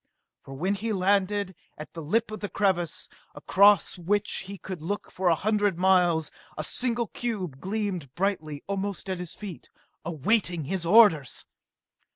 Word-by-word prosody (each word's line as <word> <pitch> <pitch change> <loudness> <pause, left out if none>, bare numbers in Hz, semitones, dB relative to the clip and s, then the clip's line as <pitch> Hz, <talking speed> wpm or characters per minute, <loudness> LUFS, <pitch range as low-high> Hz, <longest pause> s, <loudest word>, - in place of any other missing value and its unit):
For 135 - -10
when 185 +8 0
he 215 +2 -2
landed 200 0 +1 0.2
at 155 - -9
the 165 - -6
lip 215 +9 0
of 215 - -5
the 205 - -4
crevasse, 180 -5 0 0.3
across 200 -2 +4
which 205 +3 0
he 200 0 -7
could 185 -3 -7
look 200 +6 -4
for 185 -1 +1
a 165 - +4
hundred 205 -1 +1
miles, 175 -4 +3 0.3
a 155 - -2
single 240 +6 0
cube 190 - -4
gleamed 190 - -3
brightly 170 -6 -2
almost 195 -1 -3
at 185 - -3
his 180 -2 -6
feet, 200 -6 -9 0.3
awaiting 170 - 0
his 170 +3 -3
orders! 175 - +5
190 Hz, 155 wpm, -27 LUFS, 170-205 Hz, 0.3 s, orders